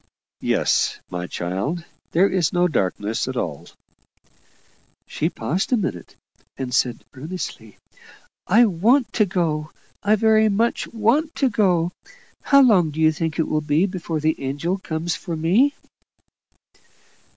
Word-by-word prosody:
"Yes, - - +1
my 90 0 -4
child. 95 - -3 0.2
There 185 +4 +3
is 185 -6 0
no 175 0 +2
darkness 105 - -1
at 130 -1 -4
all." 80 -10 -4 1.4
She 160 - -2
paused 170 - -2
a 250 - +4
minute, 95 - -4 0.4
and 130 -2 -4
said 120 -3 0
earnestly, 135 - -7 0.7
"I 225 +6 +6
want 230 +8 +2
to 215 -3 +2
go 160 -4 -1 0.3
I 210 +1 +3
very 220 0 +4
much 225 +4 0
want 240 +9 +1
to 270 -3 +1
go. 180 -5 +2 0.5
How 280 -1 +5
long 190 -10 +4
do 150 +1 -7
you 160 0 +5
think 160 0 -3
it 160 - 0
will 155 - 0
be 150 +4 +2
before 175 -4 -4
the 155 0 0
angels 165 +8 -2
come 160 -2 -4
for 175 0 -3
me?" 200 - +2
170 Hz, 140 wpm, -22 LUFS, 150-205 Hz, 1.4 s, I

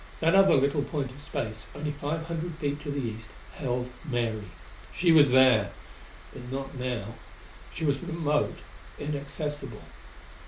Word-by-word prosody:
That 165 +1 +3
other 195 0 +7
little 140 +2 +3
point 140 -2 -2
of 140 +3 -12
space 110 -5 -4
only 150 +1 -2
five 150 +3 -3
hundred 165 0 -3
feet 145 -2 -2
to 150 - -6
the 140 0 -1
east 115 -3 -4 0.2
held 125 -3 -2
Mary; 120 -7 -1 0.5
she 175 -1 +3
was 150 -3 +8
there; 125 -5 +6 0.6
but 125 +1 -9
not 135 0 -4
now. 125 -4 -3 0.6
She 160 - -3
was 140 -2 +1
remote, 160 -4 0 0.4
inaccessible. 145 -3 -4
140 Hz, 145 wpm, -28 LUFS, 125-150 Hz, 0.6 s, was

